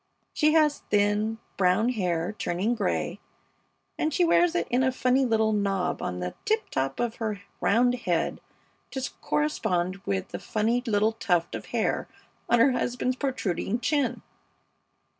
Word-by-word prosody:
She 305 0 +3
has 305 -2 +4
thin, 210 +2 +2 0.2
brown 195 +5 +3
hair 180 -6 -1
turning 190 +7 0
gray, 235 - -1 0.8
and 315 - +1
she 350 +4 +3
wears 345 +1 +3
it - - +1
in 250 +2 +3
a 260 0 +3
funny 255 +1 +2
little 220 -2 +2
knob 195 -3 0
on 90 - -3
the 90 0 -3
tip 440 0 0
top 135 0 -1
of 235 -1 -1
her 210 -3 -3 0.2
round 245 +4 +3
head 180 -9 -1 0.5
to 265 -1 -3
correspond 185 -12 0
with 100 - -3
the - - -5
funny 225 +3 0
little 215 0 +3
tuft 175 -7 0
of - - -6
hair - - -1 0.4
on 240 - +5
her 250 +4 +5
husband's 250 +1 -1
protruding 235 - -1
chin. 260 +3 0
225 Hz, 150 wpm, -27 LUFS, 195-255 Hz, 0.8 s, on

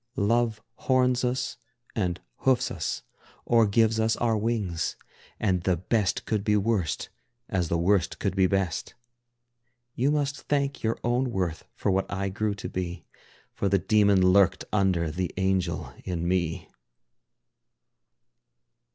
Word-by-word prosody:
Love 115 +2 +1 0.2
horns 125 -1 +3
us 125 0 -1 0.4
and 90 -5 -1 0.2
hoofs 130 -1 +2
us 75 -6 -3 0.4
or 115 -2 +4
gives 110 +2 +3
us 110 0 +2
our 115 -2 +1
wings, 105 -6 -1 0.4
And 95 -4 +1
the 90 0 +1
best 95 +2 0
could 105 -3 -1
be 105 0 +3
worst, 100 - 0 0.4
as 90 -4 0
the 85 - 0
worst 90 +1 +2
could 95 -2 -2
be 95 -1 +4
best. 95 -3 -1 1.0
You 130 +4 +1
must 145 -1 0
thank 140 -1 -1
your 110 0 0
own 125 +2 +1
worth 90 -7 -2
for - - 0
what 95 +1 0
I 100 0 -1
grew 105 +1 -1
to - - -6
be, 90 -1 -4 0.5
For 100 - -1
the 100 - +4
demon 100 0 +4
lurked 95 -2 +4
under 95 -6 +2
the 90 +2 -2
angel 95 -3 0
in 85 -2 -2
me. 85 -3 -1
100 Hz, 140 wpm, -27 LUFS, 90-115 Hz, 1.0 s, or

